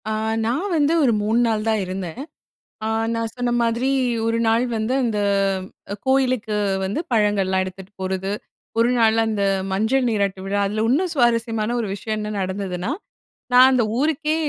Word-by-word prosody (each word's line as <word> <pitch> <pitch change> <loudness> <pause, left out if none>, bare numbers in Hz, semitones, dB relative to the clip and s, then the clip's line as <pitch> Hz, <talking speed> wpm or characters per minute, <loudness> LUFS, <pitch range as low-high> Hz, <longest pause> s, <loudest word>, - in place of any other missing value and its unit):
ஆ. - - -1 0.3
நான் 285 - -1
வந்து 300 0 +3
ஒரு 245 -4 +4
3 220 +3 +2
நாள் 220 -1 0
தான் 220 -2 +1
இருந்தேன். 185 +4 -5 0.7
ஆ - - 0 0.2
நான் 230 -1 -2
சொன்ன 245 -1 -1
மாதிரி 235 +3 +1 0.4
1 230 0 +1
நாள் 225 +2 +3
வந்து 220 +4 -1
அந்த 225 -4 0 0.9
கோயிலுக்கு 255 -5 +1 0.3
வந்து 200 +11 -2
பழங்கள்லாம் 200 -4 +2
எடுத்துட்டு 185 +1 -9
போர்றது 190 +1 -2 0.5
1 230 +1 +4
நாள் 225 -1 +4
அந்த, 215 -2 -1 0.3
மஞ்சள் 225 +7 +1
நீராட்டு 200 -4 0
விழா. 200 +1 0
அதில 215 +2 -1
இன்னும் 335 +9 +2
சுவாரஸ்யமான 230 -3 +1
1 225 - -2
விஷயம் 215 +2 -4
என்ன 210 0 -4
நடந்ததுன்னா, 190 +1 -3 0.6
நான் 250 +1 +8
அந்த 255 -2 +3 0.2
ஊருக்கே 310 +1 +1
225 Hz, 155 wpm, -22 LUFS, 200-245 Hz, 0.9 s, நான்